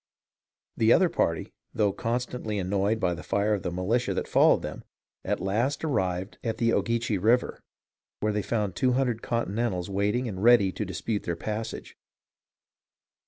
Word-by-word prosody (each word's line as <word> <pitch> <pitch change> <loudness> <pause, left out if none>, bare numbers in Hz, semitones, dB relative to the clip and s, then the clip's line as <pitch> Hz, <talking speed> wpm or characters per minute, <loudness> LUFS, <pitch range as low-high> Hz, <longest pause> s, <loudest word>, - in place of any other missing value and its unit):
The 110 0 +4
other 185 +6 +5
party, 85 - -1 0.2
though 105 -2 +2
constantly 120 -1 -3
annoyed 100 +3 0
by 90 -4 +1
the 85 - -7
fire 105 +1 0
of 100 - -1
the - - -2
militia 95 +8 0
that - - -2
followed - - +4
them, - - -6 0.4
at - - -1
last 115 +11 -1
arrived 95 - -1
at 115 -2 -2
the 115 -1 +2
Ogeechee 115 -3 0
River, 120 +5 +2 0.6
where 105 0 0
they 105 - 0
found 105 -3 -2
two 125 +6 +2
hundred 125 -3 0
Continentals 105 -5 -2
waiting 105 +6 0
and 95 -4 -5
ready 115 -4 +5
to 105 - -4
dispute 95 +4 -3
their 85 - -3
passage. 110 +5 -5
105 Hz, 160 wpm, -27 LUFS, 95-120 Hz, 0.6 s, other